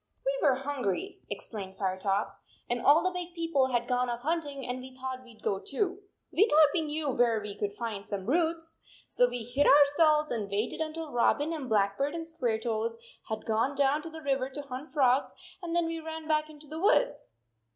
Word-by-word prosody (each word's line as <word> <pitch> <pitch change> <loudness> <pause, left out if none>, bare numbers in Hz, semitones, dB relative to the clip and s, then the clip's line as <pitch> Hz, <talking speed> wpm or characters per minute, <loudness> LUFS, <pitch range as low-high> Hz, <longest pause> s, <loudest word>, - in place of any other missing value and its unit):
"We - - +3
were 270 - +4
hungry," 275 - -3
explained 195 -4 -6
Firetop, 195 +1 -1 0.3
"and 240 0 -1
all 295 +6 +6
the 370 - +1
big 355 -1 -6
people 330 -6 +2
had 240 -2 0
gone 250 -1 +1
off 240 0 -3
hunt 325 +3 0
ing, 275 -2 -6
and 250 +1 -3
we 260 0 -11
thought 260 0 -5
we 240 -2 -15
d - - -23
go 195 - 0
too. 370 - -2 0.3
We 420 +5 +4
thought 305 -1 +7
we 345 - +2
knew 300 -2 -2
where 235 -3 +3
we 210 -1 -5
could 205 0 -3
find 220 -4 -4
some 200 -2 -5
roots. 325 +3 0 0.3
So 245 0 +3
we 245 -1 -3
hid 245 +5 +1
ourselves 300 +2 +5
and 215 -4 -2
waited 210 +9 -1
un 310 -1 -2
til 325 -2 -5
Robin 290 +6 +2
and 285 -6 -5
Blackbird 215 +8 +1
and 330 -1 -4
Squaretoes 230 -7 -1 0.3
had 220 0 -4
gone 230 +5 +1
down 280 +2 +2
to 330 - -7
the 320 0 -9
river 270 -2 0
to 290 +2 -6
hunt 275 +2 -7
frogs, 265 -3 +2 0.3
and 340 -1 -3
then 345 -1 +3
we 330 0 -3
ran 320 0 -7
back 305 0 +1
into 305 0 -13
the 310 +2 -7
woods." 415 +6 +2
275 Hz, 210 wpm, -29 LUFS, 235-315 Hz, 0.3 s, thought